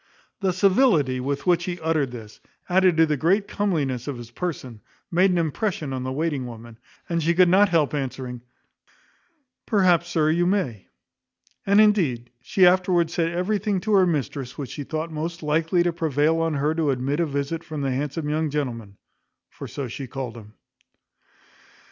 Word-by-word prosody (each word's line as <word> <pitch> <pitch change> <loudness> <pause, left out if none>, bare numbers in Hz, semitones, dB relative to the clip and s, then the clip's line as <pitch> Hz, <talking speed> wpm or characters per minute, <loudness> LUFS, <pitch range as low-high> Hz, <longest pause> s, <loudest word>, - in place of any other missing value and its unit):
The 190 -2 +1
civility 185 - +3
with 140 +2 -3
which 175 -1 +2
he 175 -1 -4
uttered 160 -4 0
this, 110 -3 -10 0.3
added 185 -2 +3
to 165 - +6
the 150 -1 0
great 195 +8 +2
comeliness 145 - -1
of 140 -3 -4
his 120 -1 -10
person, 130 -7 -5 0.3
made 180 +3 +4
an 180 - +1
impression 165 -2 -2
on 130 - -3
the 130 0 -3
waiting 145 -2 -2
woman, 115 -1 -11 0.3
and 170 -1 -1
she 170 +2 +1
could 185 0 +6
not 200 +3 +5
help 160 -5 +2
answering; 130 -3 -4 1.3
"Perhaps, 180 -5 +3
sir, 155 -2 +2
you 175 +2 +2
may;" 140 - -1 0.8
and, 200 +1 +5
indeed, 165 - +2
she 185 +7 +3
afterwards 180 -2 +3
said 165 -1 0
everything 195 +3 -1
to 215 +3 -1
her 190 -2 +5
mistress, 140 -4 -3
which 140 -3 -6
she 145 - -5
thought 155 +3 -4
most 165 +2 -5
likely 165 +3 +1
to 175 -1 0
prevail 160 0 +1
on 165 -2 0
her 145 +2 +1
to 160 -2 0
admit 135 +3 -1
a 170 - +1
visit 145 +3 -3
from 155 -2 -6
the 135 -1 -1
handsome 145 +3 -3
young 155 +1 0
gentleman; 115 -9 -4 0.5
for - - -8
so 140 -2 -5
she 130 +3 -7
called 125 -2 -6
him. 110 -2 -13
155 Hz, 175 wpm, -24 LUFS, 135-175 Hz, 1.3 s, to